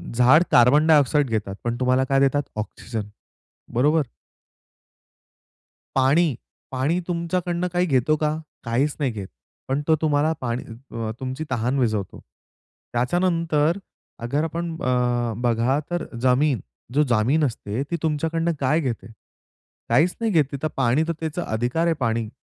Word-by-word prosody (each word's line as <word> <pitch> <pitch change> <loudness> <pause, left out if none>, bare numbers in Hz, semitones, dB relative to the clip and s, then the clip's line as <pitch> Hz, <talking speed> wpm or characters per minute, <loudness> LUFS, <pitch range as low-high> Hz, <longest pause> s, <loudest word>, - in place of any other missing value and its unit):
झाडं 130 +7 +6
carbon 140 +6 +6
dioxide 145 -2 +4
घेतात 105 -3 -2
पण 120 0 -1
तुम्हाला 130 +1 +3
काय 135 +1 +2
देतात 140 +1 +2
ऑक्सिजन, 110 0 -5 0.7
बरोबर? 150 +6 +3 1.9
पाणी, 140 +2 +3 0.4
पाणी 140 +7 0
तुमच्याकडनं 175 +1 -1
काही 180 +1 +2
घेतो 140 0 +2
का? 155 0 0 0.3
काहीच 130 +5 0
नाही 135 -4 +1
घेत. 100 -3 -6 0.4
पण 135 +2 0
तो 160 - +5
तुम्हाला 155 0 +2
पा 120 -2 -2
अ, 115 -1 -5
तुमची 130 +3 -4
तहान 125 +2 0
विझवतो. 110 -6 -1 0.7
त्याच्यानंतर 165 +4 +1 0.5
अगर 140 +6 0
आपण 165 +1 -3
अ, 125 -2 +1
बघा, 120 +3 +2
तर 175 -1 -1 0.2
जमीन, 130 -1 +3 0.3
जो 150 +2 +4
जमीन 120 +8 +2
असते 115 0 -3
ती 170 - +1
तुमच्याकडनं 165 +2 0
काय 140 +4 +2
घेते? 120 -6 -4 0.8
काहीच 155 +10 +3
नाही 225 -2 +1
घेत, 145 -4 +2
तर - - +2
पाणी, 135 +3 +3
तर 170 - 0
त्याचा 160 +2 -3
अधिकार 120 +9 0
आहे 165 - +3
पाणी. 115 -2 0
135 Hz, 135 wpm, -23 LUFS, 120-160 Hz, 1.9 s, झाडं